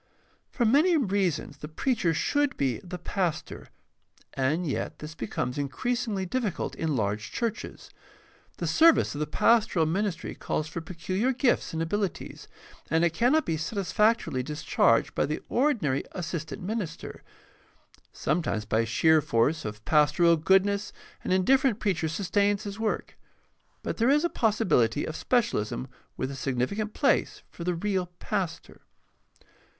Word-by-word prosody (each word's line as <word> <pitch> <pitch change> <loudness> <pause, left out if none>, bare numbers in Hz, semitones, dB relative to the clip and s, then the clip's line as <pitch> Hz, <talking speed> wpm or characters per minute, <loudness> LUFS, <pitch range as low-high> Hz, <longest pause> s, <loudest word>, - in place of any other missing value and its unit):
— - - -37
For 240 - 0
many 305 +9 +4
reasons 190 - -1
the 150 - -7
preacher 190 - 0
should 285 - 0
be 130 -4 0
the 180 0 -7
pastor, 175 -2 -3 0.7
and 145 +7 0
yet 140 - -3
this 150 +1 -8
becomes 125 0 -3
increasingly 215 - -2
difficult 210 -1 -2
in 160 -3 -2
large 105 -2 -2
churches. 230 -3 -4 0.7
The - - -3
service 325 0 +4
of 145 - -5
the 150 - -1
pastoral 220 -8 +3
minis 190 +3 0
try - - -7
calls 155 - -3
for 165 +2 -5
peculiar 185 +8 -1
gifts 255 0 +1
and 160 0 -2
abilities, 195 -1 -3 0.4
and 160 +2 +3
it 170 - +1
cannot 260 - +3
be 160 - -1
satisfactorily 200 - +1
discharged 145 -4 +1
by - - 0
the 150 - -4
ordinary 225 - +1
assistant 170 -2 -5
minister. 205 -2 -5 0.9
Sometimes 115 -11 -1
by 110 +2 +1
sheer 160 +7 +4
force 140 +5 +1
of 105 0 -7
pastoral 155 +3 +4
goodness 195 +5 +2 0.3
an - - -3
indifferent 235 +5 +3
preacher 180 -6 0
sustains 200 +4 0
his 205 0 -6
work; 220 -1 -3 0.6
but - - -3
there 235 +2 +3
is 295 +3 +4
a 345 - +2
possibility 190 - +2
of 155 - -5
specialism 130 - 0 0.3
with 130 +1 -2
a - - -6
significant 135 - -2
place - - +1
for 170 - -8
the 180 0 0
real 185 0 -1
pastor. 195 -5 -4
180 Hz, 145 wpm, -27 LUFS, 150-215 Hz, 0.9 s, many